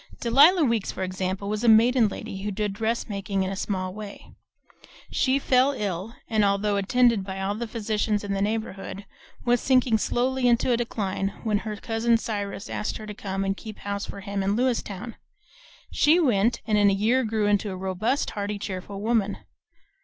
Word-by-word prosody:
Delia 290 +9 +6
Weeks, 230 -6 +1
for - - -4
example, 185 +1 -3
was 210 +2 -2
a - - +2
maiden 230 +1 +5
lady 195 -1 -6
who 205 - -2
did 205 0 -2
dressmaking 200 -3 -2
in 190 - -2
a - - -3
small 185 -1 -3
way; 210 -1 -9 0.8
she 260 +1 +2
fell 265 0 +3
ill, 205 -2 -4
and 220 -2 +2
although 200 +1 +1
attended 230 +1 +3
by 190 0 -6
all 195 +1 -1
the 230 +3 -4
physicians 215 -1 -1
in 200 -1 -2
the 195 - -1
neighborhood, 205 -2 -3 0.4
was 245 -1 +3
sinking 255 -4 +3
slowly 255 +3 0
into 240 +1 +3
a - - +4
decline 200 -5 -2 0.2
when 215 -3 +1
her 215 -1 -5
cousin 225 +2 +1
Cyrus 205 -1 -4
asked 210 - -3
her 215 - -9
to 210 - -6
come 195 -1 -3
and 195 0 0
keep 215 0 -9
house 200 0 -4
for 200 - -8
him 200 0 -3
in 195 +1 +1
Lewiston. 235 -3 -2 0.7
She 315 +4 +4
went, 235 - +2
and 215 -2 +2
in 205 -1 +5
a - - +2
year 225 +7 +2
grew 220 -2 0
into 205 0 +1
a 185 - -5
robust, 190 +8 -1
hearty, 205 0 -3
cheerful 195 0 -6
woman. 215 -2 +1
210 Hz, 185 wpm, -25 LUFS, 195-235 Hz, 0.8 s, Delia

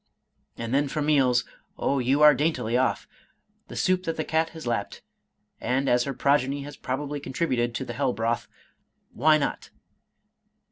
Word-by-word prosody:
— - - -45
^And 115 0 -5
then 140 +2 +2
for 150 - -3
meals 135 -5 +3 0.2
— - - -41
Oh 140 - 0
you 135 +4 +2
are 150 0 +9
daintily 135 -5 0
off! 130 +1 +1 0.3
— - - -45
The - - -9
soup 185 0 +1
that 165 0 -2
the 160 - -1
cat 160 +1 0
has 160 -3 -10
lapped; 115 -4 -3 0.6
and 135 +2 0
(as 120 -1 +3
her 140 - -3
progeny 140 0 +1
has 145 +1 -9
probably 145 +3 -4
contributed 130 -5 -1
to 130 - -3
the 120 - -6
hell 135 +1 0
broth) 115 0 -1 0.7
why 155 +5 +4
not? 145 - -3
140 Hz, 180 wpm, -26 LUFS, 125-150 Hz, 0.7 s, are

